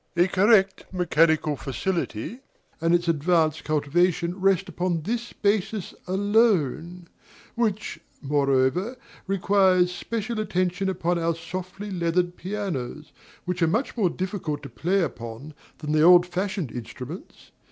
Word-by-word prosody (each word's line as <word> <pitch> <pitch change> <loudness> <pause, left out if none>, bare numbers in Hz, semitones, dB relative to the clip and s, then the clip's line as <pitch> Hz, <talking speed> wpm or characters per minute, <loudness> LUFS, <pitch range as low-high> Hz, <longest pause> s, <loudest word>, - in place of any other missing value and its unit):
A 175 +2 +5
correct 195 0 +3
mechanical 160 -4 +2
facility 135 - -3 0.4
and 165 +1 +4
its 175 0 0
advanced 160 -1 +2
cultivation 170 +4 +1
rest 195 0 +3
upon 175 -2 -2
this 235 +5 -3
basis 205 -1 -1
alone; 185 - +1 0.5
which, 215 -3 -1 0.2
moreover, 140 - +1 0.3
requires 190 -2 +3
special 220 +4 -3
attention 190 -2 0
upon 175 -1 0
our 165 0 0
softly 185 +4 -6
leathered 175 0 0
pianos, 160 -8 -5 0.3
which 180 0 -3
are 165 - +4
much 225 +11 -1
more 205 -7 +2
difficult 180 -5 -4
to 140 - -7
play 180 +10 0
upon 120 +2 -6 0.2
than 150 -1 -5
the 155 0 +3
old 175 +2 +8
fashioned 185 - -3
instruments. 125 - -9
180 Hz, 120 wpm, -25 LUFS, 160-195 Hz, 0.5 s, old